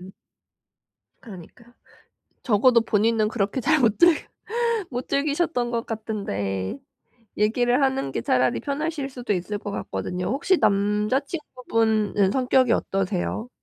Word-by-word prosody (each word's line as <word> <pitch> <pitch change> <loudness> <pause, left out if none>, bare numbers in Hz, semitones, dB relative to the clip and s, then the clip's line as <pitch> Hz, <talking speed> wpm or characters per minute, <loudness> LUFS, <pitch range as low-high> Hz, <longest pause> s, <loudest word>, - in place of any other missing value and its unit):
음. 190 +1 -11 1.1
그러니까. 225 +3 -13 0.7
적어도 235 +1 +4
본인은 220 0 +2
그렇게 215 +3 -1
잘못 255 -9 +3
즐겼 345 -2 +5 0.7
못 250 +1 -4
즐기셨던 280 -4 0
것 230 0 -2
같은데 100 - -3 0.6
얘기를 245 +5 +2
하는 265 - 0
게 115 - -3
차라리 125 +1 +1
편하실 290 0 -3
수도 245 -5 -3
있을 185 +3 -3
것 205 - -6
같거든요. 180 -2 -4
혹시 285 - +1
남자 210 +5 +2
친구분은 225 - 0
성격이 255 -1 +2
어떠세요? 195 +4 -2
225 Hz, 275 characters per minute, -24 LUFS, 200-260 Hz, 1.1 s, 즐겼